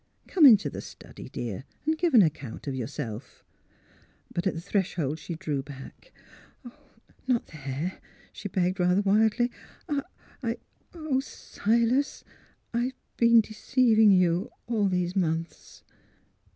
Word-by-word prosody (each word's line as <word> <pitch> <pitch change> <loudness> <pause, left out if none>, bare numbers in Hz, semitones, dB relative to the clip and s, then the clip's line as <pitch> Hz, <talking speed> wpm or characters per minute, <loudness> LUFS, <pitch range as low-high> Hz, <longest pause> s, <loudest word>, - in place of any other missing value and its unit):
" - - -33
Come 320 -6 +7
into 210 - +7
the - - -5
study, - - -11
dear, 115 -2 -5 0.2
and 315 +1 +2
give 330 -3 +1
an 215 - +9
account 145 -7 -3
of 140 - -3
yourself." 125 -2 -6 0.9
But 175 +2 -1
at 190 - 0
the - - -4
threshold 170 -5 -1
she 165 +2 -6
drew 155 -5 -2
back. 135 -1 -12 0.6
" 270 -3 -30
Not 250 -3 +1
there," 150 +4 -5 0.3
she 200 - -6
begged, 185 +1 0
rather 180 +2 +3
wildly. 220 +4 +3 0.2
'' - - -26 0.5
I 230 -2 -2 0.2
— - - -38
oh, 310 -5 -1
Silas, 235 +1 0 0.5
I've 240 +2 0 0.2
been 235 -1 +6
deceiving 220 0 +3
you 180 +3 +3
— - - -43
all 220 -4 +1
these 180 -1 -1
months." 165 -3 -3
195 Hz, 140 wpm, -27 LUFS, 160-235 Hz, 0.9 s, an